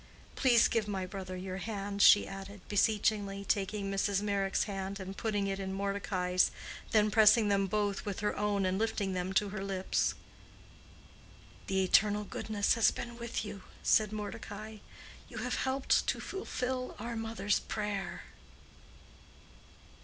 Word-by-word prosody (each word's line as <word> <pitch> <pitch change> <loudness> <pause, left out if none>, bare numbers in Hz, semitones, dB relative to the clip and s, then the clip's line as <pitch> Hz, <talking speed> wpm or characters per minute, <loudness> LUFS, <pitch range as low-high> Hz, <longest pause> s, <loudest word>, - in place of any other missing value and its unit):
Please 245 -3 +5
give 225 -3 0
my 190 -2 -2
brother 185 -1 -6
your 185 0 -5
hand," 200 0 -4
she 205 - +7
added, 195 0 -9
beseechingly, 205 -1 +1
taking 200 0 -1
Mrs. 195 0 0
Meyrick's 200 -2 +1
hand 195 -1 -4
and 190 0 -6
putting 205 -2 -1
it 195 0 -2
in 190 -1 -4
Mordecai's, 195 -2 +1 0.4
then 215 -1 +3
pressing 215 0 +6
them 195 -1 +2
both 205 0 -1
with 200 -2 -4
her 210 - 0
own 205 -2 0
and 185 +1 0
lifting 215 -3 -1
them 180 0 -2
to 205 +1 +2
her 195 -1 -5
lips. 190 -1 0 1.5
"The 190 0 +1
Eternal 210 +2 +3
Goodness 205 0 0
has 230 - +4
been 235 0 -6
with 235 -1 -3
you," 200 -2 -7 0.2
said 215 -1 +4
Mordecai. 215 0 -6 0.5
"You - - -9
have - - -2
helped 265 +1 +1
to - - 0
fulfill 255 -9 -3
our 235 +2 -5
mother's 225 -3 0
prayer." 210 -2 -4
205 Hz, 145 wpm, -32 LUFS, 195-215 Hz, 1.5 s, she